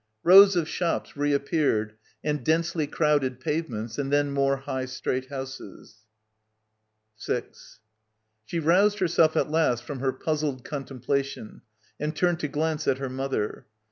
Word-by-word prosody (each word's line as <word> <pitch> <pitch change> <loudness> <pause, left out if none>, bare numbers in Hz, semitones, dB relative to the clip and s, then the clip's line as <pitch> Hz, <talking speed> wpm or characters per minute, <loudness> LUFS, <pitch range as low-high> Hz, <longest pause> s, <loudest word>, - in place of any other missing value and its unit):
Rows 195 +2 +8
of 170 -3 +1
shops 170 +1 -2
reappeared 140 -6 0 0.3
and 150 -3 -1
densely 160 +1 +1
crowded 145 -5 +1
pavements, 120 -7 -3
and 140 -1 -2
then 145 0 +2
more 135 0 +1
high 135 -1 -4
straight 130 0 -3
houses. 130 -5 -9 2.4
She 170 - -5
roused 190 +6 +3
herself 170 -4 +3
at 150 - +1
last 140 -7 +2
from 135 +2 -6
her 135 0 0
puzzled 150 -4 -2
contemplation 140 - -4 0.4
and 150 +2 -2
turned 175 -2 +1
to 150 - -2
glance 155 +1 -2
at 130 - +2
her 135 -1 -4
mother. 130 -5 -3
145 Hz, 130 wpm, -26 LUFS, 130-160 Hz, 2.4 s, Rows